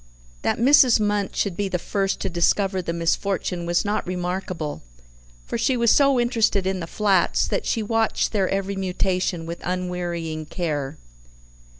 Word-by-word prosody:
That - - 0
Mrs. 255 -1 +6
Munt 205 -1 0
should 195 -4 -1
be 200 +1 -2
the 180 - 0
first 195 +2 -1
to - - -1
discover 190 +2 +1
the 170 - -3
misfortune 175 +1 -1
was 175 +3 +1
not 205 -2 -1
remarkable, 180 -3 -3 0.6
for - - -3
she 260 - +1
was 235 -1 +4
so 275 -3 +4
interested 230 -5 +1
in 190 0 -1
the 165 - -5
flats, 195 -2 +2
that - - -2
she 225 - 0
watched 225 +1 0
their 195 -4 +1
every 195 0 -2
mutation 185 -2 -1
with 170 +1 -6
unwearying 175 -3 -3
care. 150 -5 -3
190 Hz, 160 wpm, -23 LUFS, 175-210 Hz, 0.6 s, Mrs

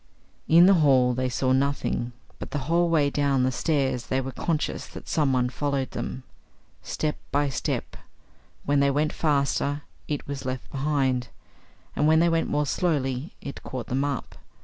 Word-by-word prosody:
In 170 +2 +7
the 195 - +7
hall 130 -4 +4
they 130 +1 -1
saw 130 +1 0
nothing, 130 -2 0 0.3
but - - -6
the - - -3
whole 170 +2 +2
way 150 -4 +3
down 140 -3 +2
the 130 - +2
stairs 135 -3 0
they 130 - +1
were 135 0 -4
conscious 155 +2 -2
that - - -11
someone 130 -5 +2
followed 140 0 -2
them; 130 - -5 0.6
step 155 -1 -2
by 145 0 +2
step; 130 - -3 0.7
when 145 0 +2
they 140 0 +4
went 150 +3 +1
faster 145 -1 0 0.2
IT 145 -2 -3
was 140 -1 -5
left 130 -1 -5
behind, 135 -3 0 0.7
and 150 - +2
when 160 0 +5
they 170 +1 +4
went 165 0 +1
more 150 0 +1
slowly 140 -3 -1
IT 140 - -7
caught 125 -3 -5
them 130 +2 +1
up. 140 -4 -3
140 Hz, 170 wpm, -26 LUFS, 130-150 Hz, 0.7 s, In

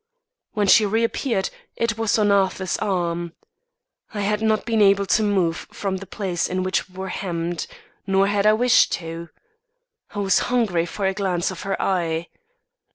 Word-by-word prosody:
When 210 -1 +1
she 215 +3 +6
reappeared, 225 0 0 0.2
it 230 -2 0
was 225 -1 +1
on 210 -2 +3
Arthur's 190 -2 +1
arm. 175 -4 -2 0.8
I 205 - -2
had 210 +1 0
not 220 -1 +1
been 225 -2 +1
able 200 0 +4
to 215 - +2
move 190 -6 0
from 195 -2 -3
the 195 +1 -9
place 185 -4 -2
in 185 0 -2
which 185 0 -1
we 185 - -18
were 190 0 -4
hemmed; 170 -2 -3 0.4
nor 195 0 +3
had 205 +1 +1
I 215 - +6
wished 245 +2 +4
to. 165 0 -5 0.9
I - - -5
was 195 -1 +3
hungry 205 -9 +1
for 195 +3 -4
a 190 - +1
glance 190 -3 -1
of 185 - -8
her 195 0 -3
eye. 170 -3 -1
195 Hz, 170 wpm, -22 LUFS, 180-210 Hz, 0.9 s, she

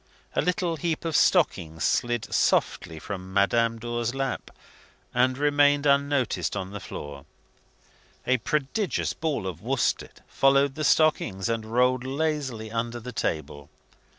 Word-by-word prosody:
A - - +3
little 175 -2 0
heap 165 +2 -2
of 165 - -1
stockings 80 0 +2
slid 120 -2 0
softly 85 -3 +1
from 95 +3 -7
Madame 115 +4 +2
Dor's 120 +1 -3
lap, 135 -1 -3 0.6
and 125 +1 +2
remained 145 0 +3
unnoticed 140 -2 +1
on 95 0 -4
the 105 - -6
floor. 70 -5 -8 1.0
A 130 - +3
prodigious 150 - -1
ball 155 -10 -2
of 90 -3 -5
worsted 130 +3 -1
followed 135 0 +3
the 155 - -4
stockings, 140 -12 +2
and 115 -1 -2
rolled 125 +1 +2
lazily 135 -5 -2
under 115 +1 -2
the 125 +2 -7
table. 75 - -3
125 Hz, 130 wpm, -26 LUFS, 105-145 Hz, 1.0 s, A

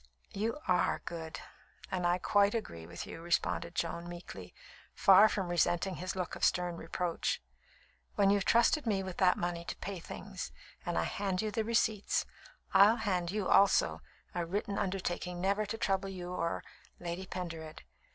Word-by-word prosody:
"You 220 +6 -1
are 180 -1 +2
good, 160 -2 -6 0.5
and 180 -2 +1
I 175 +1 +3
quite 205 +3 +3
agree 85 - -5
with 85 0 -6
you," 165 - -8
responded 170 0 0
Joan 170 +1 -2
meekly, 170 - -9 0.4
far 195 +3 +7
from 190 -4 -2
resenting 175 +2 +1
his 185 +2 -4
look 180 -2 -3
of - - -8
stern 175 -1 +2
reproach. 170 +1 -2 0.8
"When 200 -1 +4
you've 200 -1 +3
trusted 235 +6 +3
me 195 -3 +1
with 185 -2 -6
that 180 -1 +4
money 175 -1 -2
to - - -5
pay 195 -2 -5
things, - - -7 0.4
and - - 0
I 80 - +2
hand 195 - -1
you 215 - -1
the 220 +2 0
receipts, 220 -2 +1 0.5
I'll 205 +3 +7
hand 185 -7 -1
you 205 0 -1
also 200 0 +4 0.3
a 175 - -1
written 200 +3 -2
undertaking 180 -2 -2
never 200 +3 +1
to 225 +2 -3
trouble 195 -2 0
you 180 -1 -6
or 170 -2 -2 0.4
Lady 175 +2 -5
Pendered. 165 -4 -6
185 Hz, 165 wpm, -32 LUFS, 175-200 Hz, 0.8 s, far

